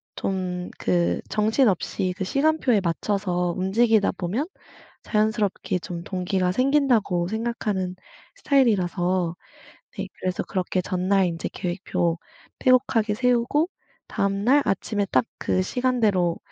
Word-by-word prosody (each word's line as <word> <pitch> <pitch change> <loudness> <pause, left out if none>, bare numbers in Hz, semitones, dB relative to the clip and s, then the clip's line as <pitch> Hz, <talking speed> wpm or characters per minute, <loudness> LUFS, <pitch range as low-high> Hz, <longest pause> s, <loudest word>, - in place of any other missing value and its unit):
좀 180 -2 -3
그 85 -1 +1
정신없이 210 -4 +1
그 190 - -3
시간표에 275 -2 +2
맞춰서 180 0 -1
움직이다 215 +3 +3
보면 215 - -1 0.5
자연스럽게 210 -3 0
좀 170 -1 -6
동기가 185 0 -1
생긴다고 250 -8 +2
생각하는 210 -4 -2 0.4
스타일이라서 185 - +1 0.6
네 - - -3
그래서 185 -1 -2
그렇게 185 -1 -1
전날 190 +1 +1
인제 170 -2 -3
계획표 175 -2 -2 0.4
빼곡하게 245 -4 +3
세우고 250 +6 +2 0.4
다음 200 0 -1
날 280 +4 +5
아침에 205 +1 0
딱 - - +3
그 185 - +1
시간대로 210 -7 +1
195 Hz, 275 characters per minute, -24 LUFS, 180-235 Hz, 0.6 s, 날